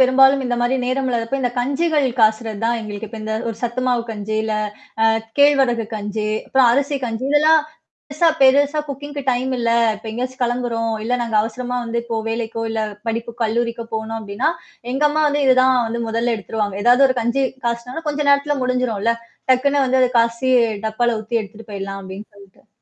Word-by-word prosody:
பெரும்பாலும் 270 +1 +5
இந்த 245 -1 0
மாரி 240 +2 +1
நேரம் 260 +1 -1
இல்லாதப்ப 240 +2 -1
இந்த 245 - 0
கஞ்சுகள் 285 +3 +1
காசுறது 220 -1 +2
தான் 235 0 +1
எங்களுக்கு 210 0 -6
இப்ப 225 +1 -8
இந்த 220 0 -3
ஒரு 225 - -4
சத்து 240 +1 -2
மாவு 245 -2 +1
கஞ்சு, 215 0 -4
இல்ல 220 -1 -2 0.5
அ - - +5 0.3
கேழ்வரகு 270 -5 +4
கஞ்சு, 210 +1 -3 0.2
அப்புறம் 265 -2 +4
அரிசி 280 +2 +1
கஞ்சு, 230 +2 -4
இதெல்லாம் 310 +2 +5 0.5
பெருசா 325 +3 +3
பெருசா 285 +3 +4
குக்கிங்க்கு 285 +1 -6
டைம் 255 +1 -1
இல்ல. 235 -1 0 0.3
இப்ப 215 - -13
எங்கேயாச்சும் 255 +3 -5
கிளம்புறோம். 235 -2 -1
இல்ல 245 +2 0
நாங்க 230 -2 -1
அவசரமா 245 +3 -3
வந்து 235 0 -2
இப்போ 230 -1 -3
வேலைக்கோ 225 0 -3
இல்ல 220 0 -1 0.3
படிப்பு 230 +1 -3
கல்லூரிக்கோ 235 +1 -1
போணோம் 220 +1 -3
அப்படின்னா, 205 +6 -1 0.4
எங்க 270 - -1
அம்மா 310 +1 0
வந்து 290 0 0
இதுதான் 255 0 +5
வந்து 235 +1 -3
முதல்ல 230 +1 0
எடுத்துருவாங்க. 210 -1 -3
ஏதாவது 250 +3 +6
ஒரு 255 - -1
கஞ்சு 240 +4 0 0.2
காய்ச்சி 245 +7 -4
கொஞ்ச 295 0 -2
நேரத்துல 285 +1 +2
முடிஞ்சுரும்ல. 250 -4 0 0.4
டக்குன்னு 275 +2 +3
வந்து 260 0 +2
அது 255 - +4
காய்சி 235 +3 +1 0.4
டப்பால 230 +1 0
ஊத்தி 225 +2 -1
எடுத்துட்டு 215 +1 -13
போயிடலாம் 195 0 -5
அப்படின்னு 190 +3 -9
சொல்ட்டு. 200 +1 -19
240 Hz, 175 wpm, -20 LUFS, 225-265 Hz, 0.5 s, ஏதாவது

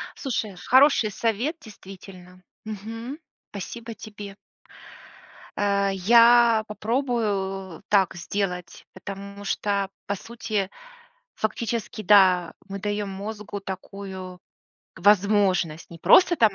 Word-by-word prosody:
Слушай, 220 -7 -3
хороший 255 +3 +4
совет, 230 - -1
действительно, 190 - -13 0.2
мгм. 225 +5 -6 0.3
Спасибо 225 +4 -7
тебе. 205 -2 -9 1.2
Э, 200 -1 +1
я 230 +3 +6
попробую 210 - -2
так 195 -2 +3
сделать, 180 -1 -4
потому 200 0 -8
что, 200 0 -1 0.2
по 200 - -1
сути, 215 -2 -3 0.7
фактически, 220 -1 -3
да, 185 -4 +5 0.2
мы 200 0 -5
даем 205 0 -2
мозгу 205 +1 -6
такую 190 -1 -8 0.6
возможность. 190 -4 +2
Не 170 - -10
просто 350 - +6
там 220 -7 +4
200 Hz, 95 wpm, -25 LUFS, 190-220 Hz, 1.2 s, я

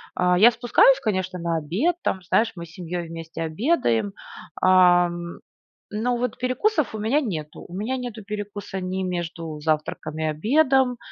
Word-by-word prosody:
А, 180 0 +3
я 230 +4 +8
спускаюсь, 245 +3 +4
конечно, 185 -5 -2
на 170 -1 -1
обед, 190 - 0
там, 190 - -1
знаешь, 225 +5 +1
мы 170 -1 -7
с 160 - -16
семьёй 175 0 -5
вместе 165 0 -7
обедаем, 155 - 0 0.5
ам. 175 -2 +4 0.5
Но 235 +4 0
вот 245 -1 -2
перекусов 255 - 0
у - - -4
меня 225 +8 +2
нету. 160 - -5
У - - -13
меня 225 +7 -2
нету 240 -4 -6
перекуса 205 -1 -5
ни 185 +1 -3
между 170 -3 -4
завтраком 155 0 -2
и - - -1
обедом, 250 - +2
185 Hz, 155 wpm, -24 LUFS, 165-240 Hz, 0.5 s, я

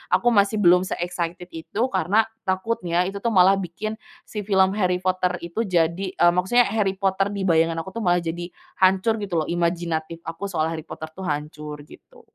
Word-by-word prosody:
aku 190 +6 0
masih 205 0 +2
belum 180 +1 +5
se-excited 175 +1 -4
itu, 165 +7 -5
karena 205 +5 +2 0.2
takutnya 185 -3 0
itu, 195 +2 -4
tuh, 230 +1 -1
malah 190 +2 +6
bikin 210 +5 -5 0.2
si 210 - -7
film 190 -2 +4
Harry 180 -1 +1
Potter 185 -1 +1
itu 185 +7 -3
jadi, 175 +1 +1
eee, 175 0 +5
maksudnya 190 +8 +3
Harry 205 -3 0
Potter 195 0 +1
di 200 - -2
bayangan 165 -2 +3
aku, 190 - -9
tuh, - - -4
malah 175 -2 +2
jadi 170 +1 -4 0.3
hancur 190 +4 +3
gitu, 200 -3 -5
loh, - - -8
imajinatif 170 -1 -2
aku 165 +4 -6
soal 160 -5 -1
Harry 160 -1 -5
Potter 155 - -8
itu - - -7
hancur 150 -1 -4
gitu. 470 - -17
180 Hz, 185 wpm, -23 LUFS, 170-195 Hz, 0.3 s, malah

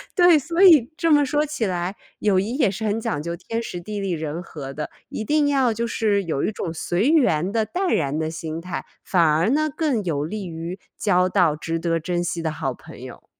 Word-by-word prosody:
对， 350 -4 +6
所 335 +6 +1
以 310 -10 +7
这 330 0 +1
么 290 -1 +5
说 295 +2 +1
起 295 -6 -2
来， 180 0 -2 0.2
友 195 -3 +3
谊 220 +6 -2
也 240 -9 +2
是 220 +3 -4
很 210 0 0
讲 145 -8 -2
究 170 +1 -4
天 225 +6 -4
时 180 -6 -6
地 210 +4 -5
利 195 -2 -2
人 160 0 -3
和 140 -6 -8
的， 150 +2 -5 0.2
一 215 - -4
定 295 +1 +2
要 265 -4 +2
就 230 +2 -2
是 210 -3 +1
有 160 -6 -2
一 - - 0
种 165 -5 -4
随 175 - 0
缘 195 - +3
的 220 0 +1
淡 360 - -1
然 145 -2 0
的 160 0 -2
心 160 0 -5
态， 180 0 -5 0.2
反 180 - +2
而 160 +6 +3
呢 310 +3 +2
更 290 -9 0
有 145 -5 -1
利 195 +5 -4
于 170 +3 -6 0.2
交 180 -3 +2
到 165 -4 +2
值 165 +1 -3
得 165 0 0
珍 175 +1 -2
惜 175 -1 -2
的 160 - -1
好 - - -2
朋 - - -13
友。 - - -11
190 Hz, 245 characters per minute, -23 LUFS, 165-245 Hz, 0.2 s, 以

